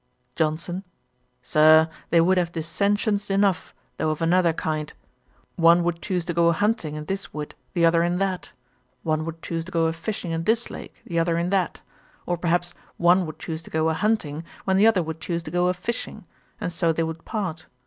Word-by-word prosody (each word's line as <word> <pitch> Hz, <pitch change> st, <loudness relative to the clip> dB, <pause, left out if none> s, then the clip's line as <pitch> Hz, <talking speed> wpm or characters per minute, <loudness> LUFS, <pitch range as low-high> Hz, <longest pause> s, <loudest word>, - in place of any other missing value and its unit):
JOHNSON. 165 Hz, +4 st, -1 dB, 0.6 s
'Sir, 155 Hz, +1 st, +6 dB, 0.2 s
they 170 Hz, -, +4 dB
would 185 Hz, +3 st, +4 dB
have 170 Hz, -1 st, -1 dB
dissentions 200 Hz, +5 st, 0 dB
enough, 195 Hz, -2 st, +1 dB, 0.3 s
though 155 Hz, -, 0 dB
of 155 Hz, -, -2 dB
another 170 Hz, +1 st, +3 dB
kind. 155 Hz, -1 st, -3 dB, 0.7 s
One 170 Hz, +1 st, +6 dB
would 170 Hz, -1 st, -1 dB
choose 180 Hz, -4 st, -2 dB
to 175 Hz, -, -2 dB
go 170 Hz, 0 st, +3 dB
a 170 Hz, -, +4 dB
hunting 185 Hz, -5 st, 0 dB
in 150 Hz, 0 st, -6 dB
this 195 Hz, 0 st, -4 dB
wood, 150 Hz, -1 st, -5 dB, 0.2 s
the 170 Hz, -1 st, +4 dB
other 165 Hz, 0 st, +4 dB
in 175 Hz, +1 st, +1 dB
that; 190 Hz, -1 st, -2 dB, 0.5 s
one 155 Hz, -1 st, 0 dB
would 165 Hz, 0 st, -7 dB
choose 165 Hz, -1 st, -3 dB
to 185 Hz, -, -10 dB
go 165 Hz, -1 st, +2 dB
a 160 Hz, -, +1 dB
fishing 175 Hz, +1 st, -4 dB
in 165 Hz, 0 st, -2 dB
this 230 Hz, +2 st, +1 dB
lake, -, -, -10 dB
the 170 Hz, -1 st, -1 dB
other 165 Hz, 0 st, +1 dB
in 170 Hz, +2 st, -1 dB
that; 190 Hz, -3 st, 0 dB, 0.4 s
or, 175 Hz, -, 0 dB
perhaps, 175 Hz, +1 st, 0 dB, 0.2 s
one 175 Hz, +1 st, +4 dB
would 155 Hz, -, -8 dB
choose 160 Hz, -1 st, -5 dB
to -, -, -13 dB
go 160 Hz, 0 st, +1 dB
a -, -, +1 dB
hunting, 165 Hz, -5 st, 0 dB, 0.2 s
when 190 Hz, 0 st, +2 dB
the 210 Hz, +3 st, +6 dB
other 200 Hz, -6 st, +4 dB
would 160 Hz, 0 st, -6 dB
choose 170 Hz, -1 st, -2 dB
to 155 Hz, -, -7 dB
go 175 Hz, +1 st, +2 dB
a 180 Hz, -, +2 dB
fishing; 225 Hz, +6 st, -5 dB, 0.3 s
and 175 Hz, -, -3 dB
so 165 Hz, 0 st, +2 dB
they 165 Hz, +1 st, 0 dB
would 160 Hz, 0 st, -5 dB
part. 185 Hz, -7 st, -4 dB
170 Hz, 210 wpm, -24 LUFS, 160-185 Hz, 0.7 s, Sir